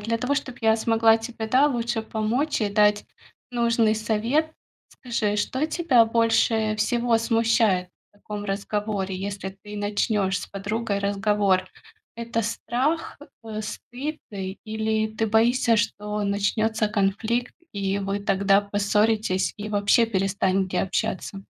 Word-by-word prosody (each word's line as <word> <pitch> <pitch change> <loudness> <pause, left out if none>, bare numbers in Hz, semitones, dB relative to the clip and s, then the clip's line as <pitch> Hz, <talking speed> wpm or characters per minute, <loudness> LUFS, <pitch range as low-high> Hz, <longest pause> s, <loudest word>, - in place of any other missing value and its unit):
для 225 +2 -1
того, 255 +5 -1
чтоб 265 -3 -4
я 220 0 +4
смогла 225 0 +3
тебе, 225 -1 -6
да, 260 +6 +4
лучше 235 -4 -1
помочь 220 +7 -1
и 205 - 0
дать 210 0 +3 0.5
нужный 235 -2 +2
совет, 230 +8 0 0.4
скажи, 220 -4 -2
что 260 +8 -1
тебя 315 -8 +3
больше 225 -1 +2
всего 235 +2 +1
смущает 225 -5 +2 0.2
в - - -79
таком 205 0 -7
разговоре, 200 -1 -2
если 195 0 -4
ты 210 0 -8
начнёшь 205 -1 0
с - - -7
подругой 205 +1 -3
разговор? 200 -1 +1 0.5
Это 230 0 -2
страх, 260 +10 -2 0.3
э, 215 -1 -5
стыд 275 +8 -6
или 220 +2 -2
ты 225 +1 0
боишься, 230 +2 +3
что 210 0 -2
начнётся 215 +2 0
конфликт, 215 +4 -1 0.2
и 200 -1 -1
вы 200 0 -2
тогда 200 0 +3
поссоритесь 205 -2 +1
и 210 +1 -5
вообще 205 +3 +3
перестанете 190 -2 0
общаться? 195 0 -3
215 Hz, 130 wpm, -24 LUFS, 200-230 Hz, 0.5 s, я